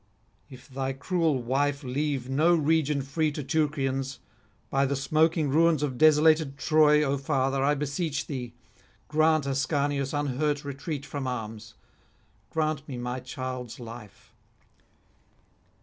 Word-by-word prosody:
If 130 -3 -13
thy 135 -1 -3
cruel 155 -2 0
wife 140 +3 0
leave 135 0 -2
no 155 +6 +3
region 150 -2 +1
free 155 +3 0
to 150 - -4
Teucrians, 135 -2 -1 0.5
by 135 0 +2
the 140 - -1
smoking 155 +3 +2
ruins 160 0 +3
of 130 -4 -3
desolated 155 -2 +4
Troy, 150 -1 +4
O 140 -1 0
father, 135 0 0
I 145 +2 +3
beseech 150 +2 -2
thee, 125 -4 -6 0.5
grant 155 -1 +3
Ascanius 140 0 0
unhurt 145 +1 -1
retreat 140 +1 -5
from 140 -2 -4
arms, 110 -3 -6 0.7
grant 155 -2 -1
me 130 -4 -6
my 125 +1 -3
child's 125 -1 -6
life. 115 -3 -11
140 Hz, 125 wpm, -27 LUFS, 130-155 Hz, 0.7 s, desolated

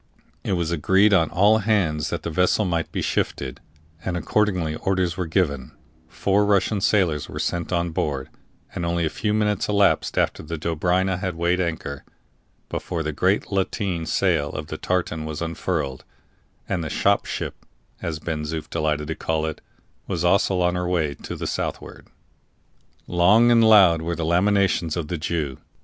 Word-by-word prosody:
It - - -1
was 85 -2 -1
agreed 95 +6 +3
on 80 -4 +4
all 100 +6 +4
hands 95 -8 +1
that 85 -2 -4
the 85 - -3
vessel 90 +5 +2
must 85 -3 -1
be - - -2
shifted; 65 -2 -2 0.4
and 90 -2 -2
accordingly 90 -4 0
orders 95 -3 0
were 90 -1 -3
given, 75 -7 -1 0.4
four 100 +1 +1
Russian 100 0 +2
sailors 90 -8 +1
were - - -7
sent 85 0 -2
on 85 -1 0
board, 70 -4 -2 0.4
and 85 - -4
only 85 0 0
a 80 - -1
few 105 - -2
minutes 105 -2 0
elapsed 100 -1 +2
after - - +1
the 85 +2 -5
Dobryna 90 +3 0
had 95 -2 -3
weighed 85 +2 +1
anchor, 80 -5 -4 0.6
before 85 -3 -3
the 75 - -2
great 95 +9 0
lateen 95 -3 -1
sail 80 -7 +1
of 75 0 -6
the 80 - -4
tartan 85 -3 -1
was 80 -1 -5
unfurled, 75 -5 -3 0.6
and 90 -4 -1
the 80 - -4
"shop - - +1
ship," - - -5 0.4
as 80 -2 -3
Ben 80 -1 -4
Zoof 75 0 -4
delighted 75 -2 -1
to - - 0
call 80 -1 -1
it, 80 - -5 0.5
was 85 -1 -1
also 95 0 +3
on 90 0 +2
her 90 0 -2
way 80 -5 0
to - - -8
the - - -5
southward. - - -4 1.0
Long 105 +8 +4
and 115 -1 +5
loud 95 -7 +6
were 85 +1 -2
the 85 0 -3
lamentations 90 -1 +2
of 80 -3 -4
the 90 - -3
Jew. 75 -4 -2
85 Hz, 170 wpm, -23 LUFS, 80-95 Hz, 1.0 s, loud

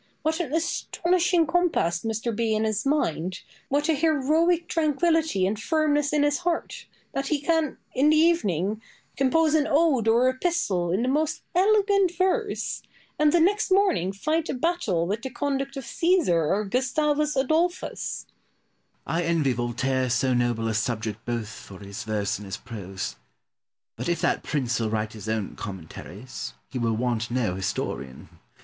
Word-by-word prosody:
What 320 +2 0
an 330 -6 -2
astonishing 340 +2 +1
compass 315 - +1
must 225 -1 -2
there 235 - -1
be 220 0 0
in 215 - +1
his 215 +3 -1
mind, 185 - 0 0.3
what 290 +2 +1
an 320 -3 +2
heroic 320 +3 +2
tranquillity 315 - +1
and 210 +3 -1
firmness 295 -2 +1
in 300 -1 +2
his 290 +1 +2
heart, 345 -1 -3 0.3
that 275 0 -2
he 300 0 +1
can, 320 0 0 0.2
in 275 +4 +4
the 310 - +5
evening, 215 - +2 0.3
compose 310 +4 +3
an 310 -1 +3
ode 285 -7 +3
or 235 +3 +4
epistle 255 - 0
in 195 +6 +1
the - - 0
most 305 +3 0
elegant 395 -1 +3
verse, 390 +3 0 0.4
and 300 0 +5
the 345 - +4
next 405 +6 +2
morning 375 - +3
fight 310 +11 -1
a - - -1
battle 250 - 0
with 205 +5 -2
the 265 - -4
conduct 275 +1 -2
of 270 - -5
Caesar 310 - +2
or 200 +7 +1
Gustavus 295 +6 +1
Adolphus! 320 +7 -1
Pope. - - -36 0.7
I 165 - 0
envy 165 -6 +1
Voltaire 125 +2 -1
so 130 +1 +2
noble 120 -2 0
a 110 - 0
subject 110 -1 -2
both 120 -3 -2
for 100 -2 -11
his 100 +1 -8
verse 105 -3 -1
and 105 - -9
his 95 - -4
prose. 95 - -6 0.8
But - - -3
if 170 -2 0
that - - +1
prince 130 -6 -1
will 110 -1 0
write 110 0 -2
his 110 -1 -7
own 110 -3 -2
commentaries, 95 +5 -8 0.2
he 130 - -3
will 115 -2 +1
want 120 -1 -1
no 120 -6 0
historian. 70 -7 -4
255 Hz, 165 wpm, -25 LUFS, -, 0.8 s, the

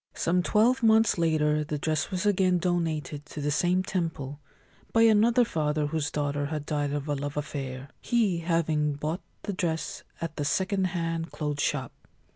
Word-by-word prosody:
Some 180 +2 +1
twelve 225 +8 +3
months 220 -4 +4
later 150 -2 +2
the 150 0 -3
dress 155 +1 -1
was 185 +1 -2
again 185 -3 +3
donated 165 -5 -1
to - - -8
the 145 0 -1
same 180 +4 +2
temple 160 -7 -3 0.5
by 230 - +4
another 230 +2 +5
father 150 -4 0
whose 150 0 -1
daughter 145 -1 -1
had 150 -1 -4
died 145 -2 -1
of 145 0 -3
a 145 - 0
love 145 +1 -4
affair, 135 -2 -4
he 220 -8 +1
having 160 -3 +1
bought 155 +5 -3 0.2
the 205 - -3
dress 165 -3 -2 0.2
at 165 -2 -5
the 145 - -1
second 190 +5 +1
hand 165 -2 -2
clothes 150 -2 -2
shop. 135 -4 -1
160 Hz, 170 wpm, -28 LUFS, 150-185 Hz, 0.5 s, another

